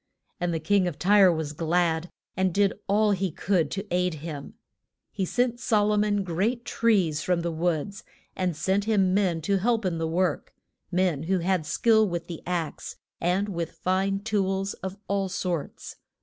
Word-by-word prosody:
And 175 Hz, -1 st, 0 dB
the 165 Hz, -, -1 dB
King 190 Hz, +3 st, +2 dB
of 170 Hz, -, -4 dB
Tyre 195 Hz, 0 st, +5 dB
was 160 Hz, -3 st, -3 dB
glad, 165 Hz, +1 st, 0 dB, 0.3 s
and 190 Hz, 0 st, +1 dB
did 200 Hz, +2 st, +2 dB
all 210 Hz, +1 st, +3 dB
he 190 Hz, -1 st, 0 dB
could 175 Hz, -2 st, 0 dB
to 195 Hz, +1 st, -4 dB
aid 180 Hz, -1 st, +1 dB
him. 150 Hz, -2 st, -7 dB, 0.6 s
He 190 Hz, -, -2 dB
sent 245 Hz, +4 st, 0 dB
So 215 Hz, -4 st, +2 dB
lo 210 Hz, 0 st, +2 dB
mon 205 Hz, -1 st, +1 dB
great 205 Hz, +8 st, -1 dB
trees 185 Hz, -10 st, +2 dB
from 175 Hz, +2 st, 0 dB
the 170 Hz, 0 st, -2 dB
woods, 170 Hz, +3 st, -2 dB, 0.3 s
and 180 Hz, -4 st, -1 dB
sent 195 Hz, +4 st, 0 dB
him 195 Hz, -4 st, +2 dB
men 185 Hz, -5 st, +1 dB
to 200 Hz, +5 st, +1 dB
help 225 Hz, +1 st, +1 dB
in 170 Hz, -3 st, -1 dB
the 165 Hz, -, -1 dB
work; 175 Hz, -1 st, -1 dB, 0.4 s
men 180 Hz, -5 st, +1 dB
who 190 Hz, -, +3 dB
had 180 Hz, -2 st, 0 dB
skill 220 Hz, +5 st, +3 dB
with 170 Hz, -1 st, -3 dB
the 170 Hz, -2 st, -7 dB
ax, 175 Hz, -3 st, -3 dB, 0.2 s
and 180 Hz, +4 st, +1 dB
with 170 Hz, -4 st, -4 dB
fine 190 Hz, +4 st, 0 dB
tools 195 Hz, -2 st, -1 dB
of 190 Hz, +1 st, -7 dB
all 195 Hz, -1 st, 0 dB
sorts. 180 Hz, -4 st, -4 dB
185 Hz, 180 wpm, -26 LUFS, 170-200 Hz, 0.6 s, Tyre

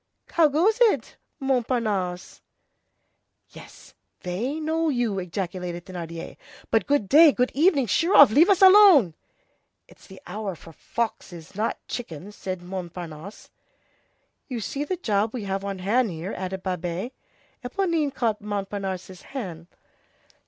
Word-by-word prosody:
How 330 Hz, -2 st, +5 dB
goes 375 Hz, -, +1 dB
it, 415 Hz, -, +2 dB, 0.2 s
Montparnasse?" 225 Hz, -9 st, -1 dB, 1.1 s
"Yes, -, -, -15 dB, 0.3 s
they 230 Hz, -, -3 dB
know 320 Hz, +1 st, 0 dB
you!" 240 Hz, -7 st, 0 dB
ejaculated 180 Hz, -1 st, -5 dB
Thénardier. 170 Hz, -3 st, -7 dB, 0.3 s
"But 225 Hz, -, +2 dB
good 285 Hz, -8 st, +1 dB
day, 310 Hz, -, +7 dB
good 250 Hz, -1 st, 0 dB
evening, 295 Hz, -3 st, +3 dB
sheer 330 Hz, -, +1 dB
off! 280 Hz, -6 st, +9 dB
leave 320 Hz, -, +5 dB
us 390 Hz, -1 st, +4 dB
alone!" 375 Hz, -, +8 dB, 0.7 s
"It's -, -, -19 dB
the 190 Hz, -1 st, -13 dB
hour 200 Hz, 0 st, -5 dB
for 165 Hz, -, -14 dB
foxes, 175 Hz, -6 st, -5 dB
not 215 Hz, +3 st, -2 dB
for -, -, -53 dB
chickens," 205 Hz, -, -7 dB
said 185 Hz, -2 st, -6 dB
Montparnasse. 175 Hz, 0 st, -8 dB, 1.0 s
"You 250 Hz, -4 st, -4 dB
see 275 Hz, +6 st, -3 dB
the 360 Hz, +5 st, -3 dB
job 215 Hz, -, 0 dB
we 235 Hz, -, -4 dB
have 195 Hz, 0 st, -3 dB
on 200 Hz, -1 st, -4 dB
hand 220 Hz, +6 st, +1 dB
here," 170 Hz, +3 st, -6 dB
added 190 Hz, 0 st, -5 dB
Babet. 180 Hz, +4 st, -3 dB, 0.5 s
Éponine 320 Hz, +1 st, -1 dB
caught 225 Hz, -5 st, -1 dB
Montparnasse's 195 Hz, -3 st, -5 dB
hand. 180 Hz, -, -7 dB
210 Hz, 130 wpm, -25 LUFS, 185-275 Hz, 1.1 s, off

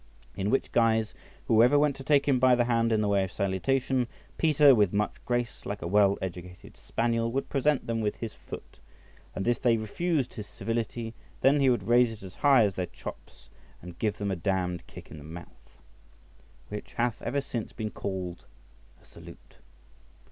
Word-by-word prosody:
In 100 Hz, 0 st, -1 dB
which 135 Hz, -, 0 dB
guise, 110 Hz, -2 st, +2 dB, 0.3 s
whoever 120 Hz, +5 st, +5 dB
went 145 Hz, -1 st, +3 dB
to 135 Hz, -, -8 dB
take 140 Hz, 0 st, +3 dB
him 135 Hz, -3 st, +3 dB
by 130 Hz, 0 st, +5 dB
the 120 Hz, 0 st, +2 dB
hand 115 Hz, -1 st, +1 dB
in 110 Hz, -1 st, +2 dB
the 105 Hz, -, +1 dB
way 100 Hz, -1 st, +2 dB
of 95 Hz, -, -5 dB
salutation, 125 Hz, +6 st, 0 dB, 0.3 s
Peter 150 Hz, -3 st, +6 dB
with 105 Hz, -6 st, +3 dB
much 105 Hz, +1 st, 0 dB
grace, 120 Hz, -1 st, -2 dB
like 100 Hz, 0 st, -5 dB
a -, -, -3 dB
well 100 Hz, +1 st, +4 dB
educated 90 Hz, -1 st, -8 dB
spaniel, 115 Hz, 0 st, -1 dB
would 135 Hz, +3 st, -2 dB
present 145 Hz, 0 st, +1 dB
them 115 Hz, -1 st, -1 dB
with 105 Hz, -1 st, -1 dB
his 115 Hz, -2 st, -6 dB
foot, -, -, -11 dB, 0.6 s
and 95 Hz, -, -3 dB
if 120 Hz, -1 st, +1 dB
they 120 Hz, -2 st, +3 dB
refused 135 Hz, -, -1 dB
his 105 Hz, -4 st, -7 dB
civility, 115 Hz, 0 st, -3 dB, 0.3 s
then 140 Hz, +2 st, +4 dB
he 135 Hz, -1 st, +4 dB
would 120 Hz, -, +1 dB
raise 120 Hz, 0 st, +5 dB
it 110 Hz, -3 st, -11 dB
as 95 Hz, -1 st, -9 dB
high 135 Hz, -1 st, +5 dB
as 100 Hz, -2 st, +1 dB
their 90 Hz, -1 st, -3 dB
chops, -, -, -11 dB, 0.3 s
and 85 Hz, -1 st, -11 dB
give 105 Hz, -2 st, 0 dB
them 100 Hz, -1 st, -2 dB
a -, -, 0 dB
damned 90 Hz, 0 st, -2 dB
kick -, -, -12 dB
on 75 Hz, -, -9 dB
the -, -, -11 dB
mouth, 85 Hz, +3 st, -12 dB, 0.9 s
which 105 Hz, 0 st, -7 dB
hath 120 Hz, -2 st, -1 dB
ever 140 Hz, -, -1 dB
since 120 Hz, -5 st, -5 dB
been 110 Hz, -2 st, -5 dB
called 90 Hz, -3 st, -5 dB, 0.6 s
a -, -, -24 dB
salute. -, -, -15 dB
115 Hz, 190 wpm, -28 LUFS, 100-125 Hz, 0.9 s, Peter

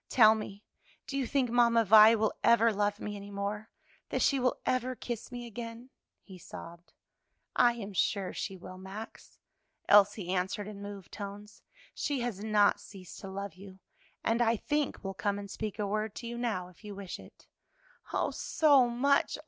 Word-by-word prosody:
"Tell 220 Hz, -3 st, +7 dB
me, 215 Hz, -2 st, -6 dB, 0.4 s
do 275 Hz, -, -6 dB
you 270 Hz, -3 st, 0 dB
think 260 Hz, -3 st, +1 dB
Mamma 235 Hz, -1 st, +4 dB
Vi 215 Hz, +2 st, +8 dB
will 220 Hz, -1 st, +1 dB
ever 230 Hz, -1 st, +5 dB
love 205 Hz, 0 st, 0 dB
me 210 Hz, -, -5 dB
any 200 Hz, 0 st, -9 dB
more? 205 Hz, +2 st, -4 dB, 0.4 s
that -, -, 0 dB
she 275 Hz, -, +3 dB
will 250 Hz, -1 st, +1 dB
ever 255 Hz, 0 st, 0 dB
kiss 235 Hz, -1 st, -6 dB
me 245 Hz, -1 st, -6 dB
again?" 235 Hz, +2 st, -8 dB, 0.3 s
he 190 Hz, -2 st, -12 dB
sobbed. 170 Hz, +1 st, -11 dB, 0.6 s
"I 245 Hz, -1 st, +5 dB
am 210 Hz, -4 st, -7 dB
sure 195 Hz, 0 st, 0 dB
she 195 Hz, -2 st, -4 dB
will, 185 Hz, +1 st, -10 dB
Max," 195 Hz, +4 st, -10 dB, 0.5 s
Elsie 205 Hz, -2 st, +5 dB
answered 190 Hz, +3 st, -1 dB
in 205 Hz, -1 st, -8 dB
moved 200 Hz, -2 st, -8 dB
tones; 205 Hz, +1 st, -8 dB, 0.3 s
"she 285 Hz, -3 st, -2 dB
has 225 Hz, -5 st, -3 dB
not 210 Hz, -2 st, +3 dB
ceased 185 Hz, -3 st, -11 dB
to 195 Hz, -, -8 dB
love 200 Hz, 0 st, -5 dB
you, 190 Hz, +1 st, -13 dB, 0.5 s
and 230 Hz, +1 st, +1 dB
I 230 Hz, -1 st, +3 dB
think 295 Hz, +3 st, -2 dB
will 195 Hz, 0 st, -4 dB
come 200 Hz, +2 st, -1 dB
and 200 Hz, -1 st, -7 dB
speak 215 Hz, -2 st, -4 dB
a 210 Hz, -, -1 dB
word 215 Hz, +1 st, -2 dB
to 240 Hz, -, -7 dB
you 235 Hz, -, -5 dB
now, 225 Hz, -7 st, -2 dB
if 180 Hz, -, -21 dB
you 205 Hz, -1 st, -7 dB
wish 195 Hz, -2 st, -7 dB
it." -, -, -16 dB, 0.7 s
"Oh, -, -, 0 dB
so 280 Hz, -6 st, +4 dB
much! 275 Hz, +4 st, +2 dB
210 Hz, 180 wpm, -31 LUFS, 200-235 Hz, 0.7 s, Vi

